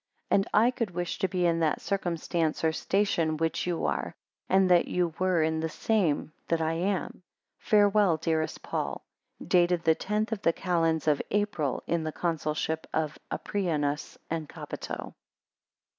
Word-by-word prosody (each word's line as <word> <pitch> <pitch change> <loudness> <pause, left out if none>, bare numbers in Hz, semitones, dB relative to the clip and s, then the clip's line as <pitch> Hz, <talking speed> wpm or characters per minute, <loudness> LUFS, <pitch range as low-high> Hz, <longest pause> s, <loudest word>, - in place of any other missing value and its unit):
5 - - +6
And 195 - +2
I 235 +3 +5
could 230 -4 -2
wish 175 -1 -3
to 190 - +2
be 180 -1 0
in 165 -1 +2
that 160 -2 +1
circumstance 170 -4 -1
or 160 - +4
station 165 -3 +1
which 165 +2 -1
you 175 -2 -1
are, - - -2 0.3
and 190 0 +4
that 175 -1 +5
you 175 -2 0
were 185 -3 +2
in 160 0 0
the 160 0 -1
same 165 -6 0
that 165 - +1
I 160 0 0
am. 185 +2 -2 0.4
Farewell, 205 -4 +4
dearest 160 -1 -1
Paul. - - -3 0.4
Dated 175 -1 +3
the 160 - +5
tenth 210 +6 -2
of 215 -3 -2
the 165 - +3
calends 165 -4 0
of 150 -2 +3
April, 200 -10 0
in 170 -1 0
the 155 - -2
Consulship 160 -1 -2
of 155 -1 -1
Aprianus 150 -7 -2
and 160 -2 -3
Capito. - - -6
170 Hz, 160 wpm, -28 LUFS, 160-190 Hz, 0.4 s, 5